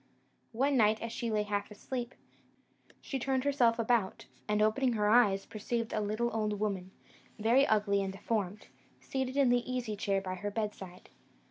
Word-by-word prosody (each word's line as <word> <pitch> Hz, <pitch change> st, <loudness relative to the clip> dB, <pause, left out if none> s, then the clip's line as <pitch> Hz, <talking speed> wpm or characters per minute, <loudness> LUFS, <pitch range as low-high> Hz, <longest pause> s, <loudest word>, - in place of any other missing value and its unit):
"One 270 Hz, +4 st, +2 dB
night, 215 Hz, -1 st, +4 dB
as 230 Hz, -, -5 dB
she 235 Hz, 0 st, -3 dB
lay 215 Hz, -1 st, +1 dB
half 205 Hz, -1 st, -2 dB
asleep, 240 Hz, +3 st, -5 dB, 0.9 s
she 270 Hz, -, -4 dB
turned 260 Hz, +1 st, 0 dB
herself 255 Hz, -5 st, +3 dB
about, 230 Hz, -4 st, 0 dB, 0.2 s
and, 210 Hz, 0 st, +1 dB
opening 230 Hz, +4 st, +2 dB
her 210 Hz, -2 st, +1 dB
eyes, 210 Hz, -4 st, +4 dB
perceived 230 Hz, +2 st, -3 dB
a 215 Hz, -, 0 dB
little 215 Hz, +3 st, -1 dB
old 210 Hz, -2 st, -1 dB
woman, 195 Hz, -3 st, -2 dB, 0.5 s
very 240 Hz, +6 st, +4 dB
ugly 205 Hz, -2 st, +2 dB
and 195 Hz, -1 st, -2 dB
deformed, 200 Hz, 0 st, -3 dB, 0.3 s
seated 265 Hz, 0 st, -3 dB
in 275 Hz, -3 st, +4 dB
the 245 Hz, +1 st, +1 dB
easy 245 Hz, -4 st, -2 dB
chair 195 Hz, -1 st, 0 dB
by 185 Hz, -1 st, -5 dB
her 205 Hz, +3 st, -4 dB
bedside. 200 Hz, -4 st, -5 dB
215 Hz, 165 wpm, -31 LUFS, 205-245 Hz, 0.9 s, night